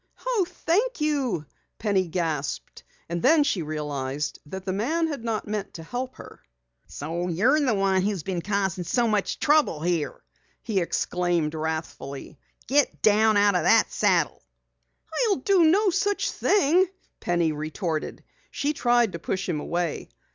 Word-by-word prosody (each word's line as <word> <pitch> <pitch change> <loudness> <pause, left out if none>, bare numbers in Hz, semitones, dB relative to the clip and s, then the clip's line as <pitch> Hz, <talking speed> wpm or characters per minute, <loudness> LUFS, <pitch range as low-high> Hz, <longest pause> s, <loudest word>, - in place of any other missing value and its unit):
"Oh, 460 -8 +1
thank 400 +7 0
you!" 280 - 0 0.3
Penny 200 -4 +1
gasped, 160 -5 -3 0.2
and 170 0 -3
then 300 +3 +5
she 215 -11 0
realized 150 -2 -3
that 190 +4 -7
the 190 - -1
man 305 - 0
had 290 -7 -4
not 225 -2 -2
meant 210 -1 -4
to 165 - -7
help 250 +8 -5
her. - - -12 0.5
"So 165 +4 -4
you're 220 - +3
the 260 -7 +2
one 195 -1 +2
who's 195 -4 -1
been 185 -3 -3
causing 195 -2 -1
so 240 +6 +1
much 210 -2 0
trouble 300 - +3
here!" 170 -3 -1 0.4
he 215 -5 0
exclaimed 175 -2 0
wrathfully. 155 -3 -5 0.3
"Get 285 +1 +1
down 215 0 +4
out 205 0 +4
of 180 - +2
that 225 0 +4
saddle!" - - +1 0.9
"I'll 400 - +3
do 355 +5 +3
no 385 +5 +4
such 405 +3 0
thing!" 370 0 +3 0.3
Penny 170 -2 +1
retorted. 155 +2 -4 0.3
She 290 +2 -1
tried 240 -5 +2
to 170 - -6
push 185 +3 -3
him 165 -5 -1
away. 170 +1 -3
200 Hz, 150 wpm, -25 LUFS, 165-275 Hz, 0.9 s, then